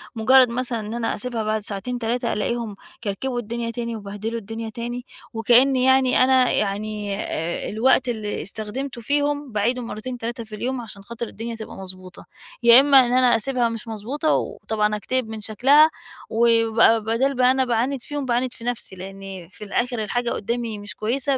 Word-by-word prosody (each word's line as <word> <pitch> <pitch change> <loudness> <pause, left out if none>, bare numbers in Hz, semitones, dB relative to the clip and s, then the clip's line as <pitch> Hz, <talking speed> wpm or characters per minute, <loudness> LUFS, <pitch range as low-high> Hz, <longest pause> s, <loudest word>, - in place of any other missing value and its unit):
مجرد 255 +2 +5
مثلًا 240 -1 -2
إن 215 +1 -6
أنا 235 -1 -1
أسيبها 240 -3 -3
بعد 215 0 -1
ساعتين، 220 +5 -2
3 235 +1 -1
ألاقيهم 225 0 -2 0.3
كركبوا 240 +5 -2
الدنيا 235 +1 -4
تاني 235 0 -4
وبهدلوا 210 +2 -5
الدنيا 225 +1 -6
تاني، 240 +2 -5 0.3
وكأني 250 +3 +4
يعني 260 -1 +4
أنا 255 -1 +4
يعني 205 0 -2
آآ، 165 +2 -3
الوقت 250 +3 +2
اللي 215 -3 -3
استخدمته 235 +5 -5
فيهم 290 +2 -1
باعيده 230 +4 0
مرتين، 240 +2 -6
3 235 0 -5
في 215 -1 -9
اليوم 250 +3 -3
عشان 210 -3 -8
خاطر 235 +2 -6
الدنيا 230 +2 -6
تبقى 220 -1 -9
مضبوطة، 185 -1 -9 0.4
يا 235 +1 +9
إما 275 0 +7
إن 240 - -1
أنا 250 -1 +5
أسيبها 245 +1 +1
مش 230 0 -6
مضبوطة 245 +9 -1
وطبعًا 210 -1 -1
أكتئب 225 +4 -2
من 220 0 -6
شكلها، 270 +9 +5 0.4
وبقى 230 0 +4
بدال 240 +6 +1
بقى 250 0 +4
أنا 260 0 +2
باعاند 245 +3 0
فيهُم، 290 +2 -4
باعاند 245 0 0
في - - -12
نفْسي، 240 -5 -3
لأني 190 -1 -9
في 210 - -12
الآخر 240 +2 -1
الحاجة 240 +3 -1
قدامي 235 +2 -2 0.2
مش 205 -5 -7
كويسة 265 +5 0
235 Hz, 170 wpm, -23 LUFS, 215-250 Hz, 0.4 s, يا